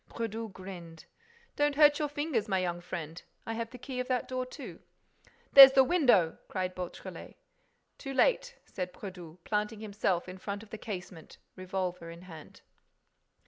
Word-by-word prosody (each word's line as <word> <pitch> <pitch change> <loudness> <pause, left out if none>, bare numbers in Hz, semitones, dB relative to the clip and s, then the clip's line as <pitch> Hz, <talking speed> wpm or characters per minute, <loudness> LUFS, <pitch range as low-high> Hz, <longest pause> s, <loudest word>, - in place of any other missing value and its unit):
Brédoux 225 -1 -4
grinned: 175 -4 -10 0.5
"Don't 290 -1 +1
hurt 295 0 +6
your 300 - 0
fingers, 290 -7 -1
my 195 -2 +1
young 175 -1 -2
friend. 165 -2 -6 0.2
I 225 - -3
have 230 0 -4
the 250 - -10
key 250 +1 -6
of 250 - -2
that 255 -2 -1
door, 255 0 -3
too." - - -9 0.7
"There's 270 -1 +12
the 265 - +7
window!" 250 - +3
cried 185 -1 -3
Beautrelet. 180 -1 -8 0.6
"Too 270 -1 -6
late," - - +2
said 180 -1 -5
Brédoux, 180 -5 -9
planting 210 +1 -2
himself 200 -4 -1
in 185 +1 -9
front 200 +2 -5
of 220 - -17
the 220 - -7
casement, 185 -6 -8 0.2
revolver 185 -2 -4
in 170 +1 -11
hand. 160 -4 -12
205 Hz, 160 wpm, -30 LUFS, 180-255 Hz, 0.7 s, There's